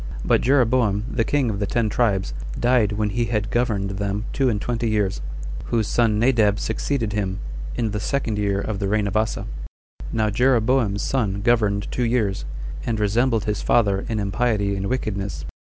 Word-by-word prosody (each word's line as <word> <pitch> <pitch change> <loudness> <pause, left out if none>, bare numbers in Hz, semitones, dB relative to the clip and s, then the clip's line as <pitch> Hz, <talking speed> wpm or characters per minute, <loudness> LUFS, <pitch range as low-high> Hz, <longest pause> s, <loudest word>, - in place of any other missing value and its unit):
But - - +3
Jeroboam, 120 -5 +3
the 115 - +1
king 135 -2 +1
of 100 - -4
the 100 - -1
ten 115 +1 +1
tribes, 105 -3 +1 0.3
died 120 -4 +3
when 105 0 0
he 120 +3 0
had 110 -2 -1
governed 105 -5 0
them 100 +2 -2
two 135 -2 +2
and 105 -3 0
twenty 115 +1 -1
years; 105 -3 0 0.4
whose 110 -3 0
son 115 -3 +2
Nadab 110 -3 +3
succeeded 115 -1 -1
him, 95 -2 -1 0.4
in 115 -3 -1
the 105 - -2
second 110 -2 -1
year 100 -1 +1
of 100 0 -3
the 100 - -1
reign 105 +1 +1
of 100 +1 -3
Asa. 110 0 0 0.7
Now 110 -1 +1
Jeroboam's 120 -3 +2
son 100 -7 0
governed 105 -3 +2
two - - -2
years, 115 -5 0 0.4
and 115 -2 -1
resembled 115 +2 +1
his 105 -1 -1
father 100 -4 +2
in 110 - -1
impiety 100 0 0
and 100 0 -2
wickedness. 100 - -3
110 Hz, 175 wpm, -23 LUFS, 100-120 Hz, 0.7 s, But